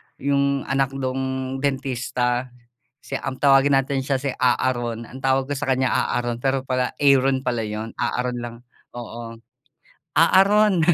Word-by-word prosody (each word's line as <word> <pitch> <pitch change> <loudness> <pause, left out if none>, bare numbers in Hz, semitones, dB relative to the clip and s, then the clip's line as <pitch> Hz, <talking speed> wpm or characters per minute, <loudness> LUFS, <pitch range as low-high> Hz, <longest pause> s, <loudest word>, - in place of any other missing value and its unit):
yung 140 0 0
anak 135 0 -1
nung 130 0 -3
dentista. 130 -2 -1 0.5
Si 135 - -7
ang 135 -1 -4
tawagin 135 0 +5
natin 135 0 -2
siya 135 0 0
si 135 -1 -2
A-a-ron 120 -2 0
ang 130 - -11
tawag 135 0 +2
ko 145 - -2
sa 135 - -3
kaniya 130 0 +2
A-a-ron 120 -1 0
pero 135 -1 0
pala 130 -1 0
Aaron 135 -2 +4
pala 120 -2 0
yun, 110 +1 -5
A-a-ron 125 0 -1
lang, 120 -1 -6 0.4
oo. 115 -1 -8 0.8
"A-a-ron." 195 +3 +5
130 Hz, 145 wpm, -22 LUFS, 125-135 Hz, 0.8 s, tawagin